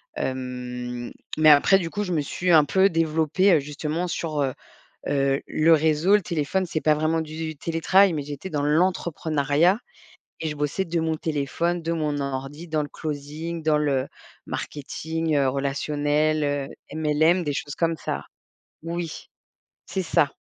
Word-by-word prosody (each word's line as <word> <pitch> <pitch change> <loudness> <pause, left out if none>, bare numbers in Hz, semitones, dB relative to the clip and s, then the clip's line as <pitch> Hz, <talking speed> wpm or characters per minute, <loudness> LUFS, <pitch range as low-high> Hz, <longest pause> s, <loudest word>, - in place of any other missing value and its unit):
Hem, 125 -1 -4 0.3
mais 155 0 +7
après 150 +6 +7
du 165 -2 -3
coup, 205 +4 -2
je 180 -3 -2
me 155 - +1
suis 175 +5 -1
un 155 -2 +7
peu 190 +4 +4
développée, 165 +3 +2
heu, - - +5
justement 150 +4 -3
sur, 155 -4 -2
heu 135 -2 0 0.6
heu, 135 -1 +1
le 165 +2 +4
réseau, 160 +5 +4
le 210 - +3
téléphone, 170 +3 -1
c'est 160 -2 -2
pas 155 - +4
vraiment 155 +2 +1
du 155 -1 -5
télétravail, 170 +4 +3
mais 145 -2 -2
j'étais 145 +6 -7
dans 145 -3 -1
l'entrepreneuriat 160 0 +2 0.6
et 160 - -1
je 150 - -4
bossais 150 +6 -1
de 170 -1 -2
mon 160 0 0
téléphone, 160 +3 -1
de 165 +1 -1
mon 150 -3 -1
ordi, 140 +4 -5
dans 155 -1 0
le 145 - -7
closing, 155 +2 -5
dans 155 -1 +3
le 140 -3 0 0.4
marketing, 160 +2 -3
heu, 135 -1 +3
relationnel, 145 +3 0
heu, 145 -1 -1 0.3
MLM, 160 +3 +2
des 145 - -1
choses 145 +1 -4
comme 165 -1 +1
ça - - -4 0.6
oui, 170 -1 -5 0.6
c'est 190 +1 -2
ça. 165 -4 +2
155 Hz, 160 wpm, -24 LUFS, 145-165 Hz, 0.6 s, mais